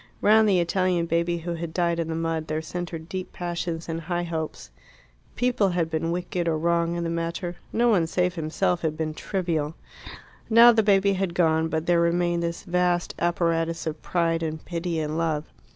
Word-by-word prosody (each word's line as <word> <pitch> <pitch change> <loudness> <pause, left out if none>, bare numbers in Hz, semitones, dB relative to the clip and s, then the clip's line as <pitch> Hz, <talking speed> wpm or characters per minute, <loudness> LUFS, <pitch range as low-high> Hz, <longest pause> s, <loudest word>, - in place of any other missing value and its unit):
Round 215 0 +5
the 190 -3 +4
Italian 180 0 +1
baby 170 +1 0
who 170 +1 -4
had 165 -1 -6
died 170 -1 +1
in 165 - -1
the 165 - -3
mud 165 -1 -2
there 155 +1 -1
centred 165 0 -6
deep 185 +1 -5
passions 170 -1 -4
and 165 0 -3
high 175 +1 -2
hopes. 160 -2 -5 0.6
People 245 -5 +2
had 170 -2 -1
been 165 +1 -1
wicked 175 0 -2
or 160 -1 +1
wrong 170 +1 +1
in 170 - -2
the 165 - -2
matter; 170 +1 -3
no 240 +2 +2
one 180 -7 +3
save 180 +2 0
himself 170 +2 -1
had 155 -1 -2
been 155 -1 -2
trivial. 165 -4 -2 0.7
Now 235 +1 +8
the 225 -1 +3
baby 200 -1 +3
had 190 -2 -2
gone, 160 -2 +3
but 160 0 -2
there 170 -1 +3
remained 170 0 +1
this 170 0 -3
vast 180 -1 0
apparatus 165 -1 0
of 155 -1 -4
pride 165 -2 0
and 160 -1 -4
pity 170 -1 -3
and 155 +1 -2
love. 155 -3 0
170 Hz, 190 wpm, -25 LUFS, 165-180 Hz, 0.7 s, Now